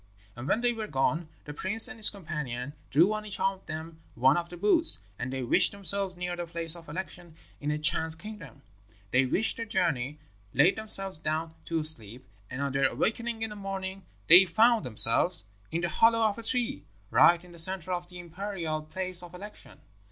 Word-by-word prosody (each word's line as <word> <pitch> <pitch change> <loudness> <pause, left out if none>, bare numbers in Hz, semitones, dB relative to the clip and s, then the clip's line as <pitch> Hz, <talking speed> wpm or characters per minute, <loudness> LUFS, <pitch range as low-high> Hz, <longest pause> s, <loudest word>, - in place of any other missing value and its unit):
"And 120 +3 -8
when 220 - +1
they 245 0 +2
were 220 -2 -6
gone, 155 +2 -1 0.2
the 150 - -8
prince 205 +10 +6
and 250 - -9
his 215 - +6
companion 150 - -6 0.2
drew 175 +8 +3
on 215 0 -4
each 205 -2 -4
of 195 0 -1
them 160 +1 -8 0.2
one 130 +3 +4
of 170 0 -3
the 175 - -10
boots, 210 - +3 0.2
and 130 - -4
they 130 -1 -4
wished 120 - +4
themselves 200 -1 +2
near 180 0 -4
the 175 -1 -6
place 165 -1 0
of 165 -3 -13
election 175 0 -7 0.2
in 145 - -4
a 150 - -1
Chan's 160 +1 +1
kingdom. 210 -7 -11 0.5
They 130 +1 +2
wished 210 +12 0
their 230 - -4
journey, 150 - -1 0.4
laid 150 +9 +4
themselves 195 -5 0
down 160 +1 -3
to 165 -2 -2
sleep, 125 -5 -2 0.2
and 135 +2 -5
on 140 - -2
their 135 +1 +2
awaking 230 0 -2
in 220 - -3
the - - -8
morning 195 -1 -6 0.2
they 180 +4 +8
found 220 +5 +3
themselves 105 -5 +3 0.3
in 165 +1 -2
the 175 - -1
hollow 230 +6 +3
of 215 +1 -4
a - - -6
tree, 250 +3 -1 0.3
right 175 +1 +4
in 180 - -16
the 170 - -5
centre 185 +1 +4
of 175 0 -5
the 180 - -11
imperial 175 -2 -5
place 185 +3 -3
of 175 0 -12
election. 205 +3 -11
175 Hz, 200 wpm, -28 LUFS, 155-200 Hz, 0.5 s, they